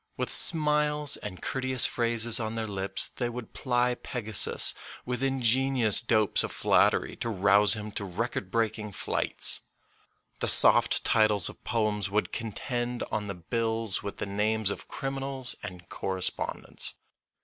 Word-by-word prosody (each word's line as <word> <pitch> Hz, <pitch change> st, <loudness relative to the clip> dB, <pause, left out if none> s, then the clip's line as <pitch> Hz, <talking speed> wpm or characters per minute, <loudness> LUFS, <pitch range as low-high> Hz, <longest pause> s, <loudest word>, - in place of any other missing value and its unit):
With -, -, -1 dB
smiles 150 Hz, -2 st, +2 dB
and 95 Hz, -3 st, -9 dB
courteous 130 Hz, -1 st, +1 dB
phrases 115 Hz, -1 st, +1 dB
on 110 Hz, 0 st, -4 dB
their 115 Hz, -1 st, -2 dB
lips 100 Hz, -2 st, 0 dB
they 120 Hz, -1 st, -3 dB
would 120 Hz, -1 st, -8 dB
ply 125 Hz, -1 st, 0 dB
Pegasus 110 Hz, -6 st, +1 dB, 0.3 s
with 125 Hz, 0 st, -2 dB
ingenious 130 Hz, -3 st, +3 dB
dopes 110 Hz, -4 st, +2 dB
of -, -, -4 dB
flattery -, -, +2 dB
to 115 Hz, -, -3 dB
rouse 100 Hz, +1 st, +4 dB
him 105 Hz, 0 st, -7 dB
to 100 Hz, -, -4 dB
record 100 Hz, +1 st, -4 dB
breaking 110 Hz, -1 st, -2 dB
flights. -, -, +2 dB, 0.8 s
The -, -, -1 dB
soft -, -, +4 dB
titles 105 Hz, -4 st, +3 dB
of -, -, -14 dB
poems 105 Hz, -3 st, -1 dB
would 105 Hz, +2 st, -1 dB
contend 120 Hz, +2 st, -4 dB
on 105 Hz, -1 st, -2 dB
the 100 Hz, -, -5 dB
bills 110 Hz, +3 st, -1 dB
with 100 Hz, -1 st, -7 dB
the -, -, -3 dB
names 105 Hz, +1 st, 0 dB
of -, -, -7 dB
criminals 135 Hz, -1 st, -2 dB
and 90 Hz, -3 st, -9 dB
co -, -, -7 dB
respondents. 95 Hz, -1 st, -2 dB
110 Hz, 145 wpm, -28 LUFS, 105-125 Hz, 0.8 s, rouse